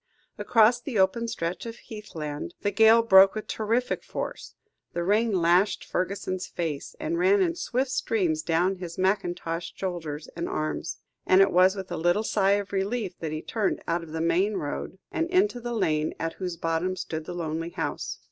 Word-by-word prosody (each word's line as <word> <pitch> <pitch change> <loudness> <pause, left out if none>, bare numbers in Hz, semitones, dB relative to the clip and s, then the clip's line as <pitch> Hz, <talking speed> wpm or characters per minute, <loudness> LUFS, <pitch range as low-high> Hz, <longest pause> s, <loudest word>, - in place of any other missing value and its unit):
Across 230 +1 +4
the 245 -3 -4
open 195 +5 +2
stretch 180 -2 -3
of 230 - -6
heathland, 170 -11 -7
the 205 - 0
gale 225 +3 +6
broke 195 -2 +7
with 215 - -4
terrific 230 +3 -1
force, - - -6 0.4
the 175 - -1
rain 215 +5 +2
lashed 180 +2 +3
Fergusson's 185 0 -2
face 160 -5 -4
and 320 +2 -2
ran 390 +3 +4
in 355 -3 +2
swift 265 -6 -1
streams 185 -11 0
down 175 +4 +1
his 175 -2 -7
mackintoshed 175 -3 -1
shoulders 160 -5 -4
and 170 +1 -3
arms; 155 0 -3 0.3
and 185 - +6
it 195 - +5
was 185 +2 +5
with 190 -2 -7
a 175 - -2
little 175 +6 +2
sigh 200 -2 +2
of 200 0 -2
relief 195 -1 -2
that 160 -2 -4
he 155 0 -4
turned 215 -3 -1
out 170 +1 0
of 165 -2 -10
the 160 0 -3
main 180 +6 +2
road, 145 +4 -4
and 330 -3 -1
into 370 -6 +2
the 240 0 -4
lane 155 -7 0
at 165 0 -2
whose 180 -3 -5
bottom 165 +3 -1
stood 160 -3 -5
the 175 - -6
lonely 165 0 -3
house. 170 -1 -4
190 Hz, 185 wpm, -26 LUFS, 170-220 Hz, 0.4 s, broke